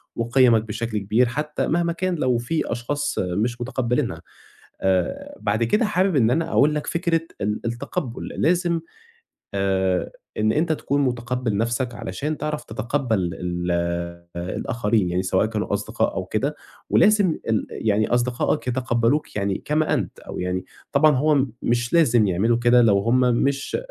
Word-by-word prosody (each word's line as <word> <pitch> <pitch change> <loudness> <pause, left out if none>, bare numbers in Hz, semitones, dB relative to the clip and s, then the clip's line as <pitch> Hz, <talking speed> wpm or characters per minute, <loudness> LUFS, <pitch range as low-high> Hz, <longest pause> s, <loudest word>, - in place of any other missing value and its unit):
وقِيَمك 115 -1 +4
بشكل 110 +1 -3
كبير 105 +5 +2
حتى 150 +5 -2
مهما 170 0 +1
كان 185 +1 -1
لو 130 -6 +1
في 125 +8 -2
أشخاص 145 +5 -2
مش 110 +7 -1
متقبّلينها 125 -1 -1 0.6
آآ، 95 -2 -1
بعد 105 +2 +1
كده 210 - +2
حابب 190 -3 +1
إن 120 -4 +4
أنا 165 +5 0
أقول 150 +2 +4
لك 150 - -3
فكرة 170 -1 +1 0.2
ال 105 +1 -1
التقبُّل 120 +1 -4
لازم 170 0 +1 0.7
آآ، 95 -2 0 0.3
إن 110 0 +2
أنت 160 +4 +1
تكُون 145 -2 -1
مُتقبِّل 125 -3 -1
نَفْسك 120 +3 -1
علشان 145 +13 -4
تعرَف 150 0 -3
تتقبّل 115 -4 -1
ال 90 0 -3 0.7
الآخرين 105 +3 -1
يعني 90 +1 0
سواء 95 +2 +1
كانوا 110 -2 -3
أصدقاء 100 - -1
أو - - -2
كده، - - -1 0.3
ولازم 185 - +4
ال 110 -1 +1
يعني 110 0 0
أصدقائك 125 +4 0
يتقبّلوك 125 +2 0
يعني 100 -1 -1
كما 155 +1 +1
أنت - - -3
أو - - -8
يعني 90 0 -2 0.3
طبعًا 150 +2 +5
هو 145 0 +3 0.2
مش 120 0 0
لازم 120 -10 +4
يعملوا 105 +6 +2
كده 120 +1 +5
لو 105 -4 +4
هُم 115 +5 +2
مش 130 +3 +1
120 Hz, 150 wpm, -23 LUFS, 105-145 Hz, 0.7 s, طبعًا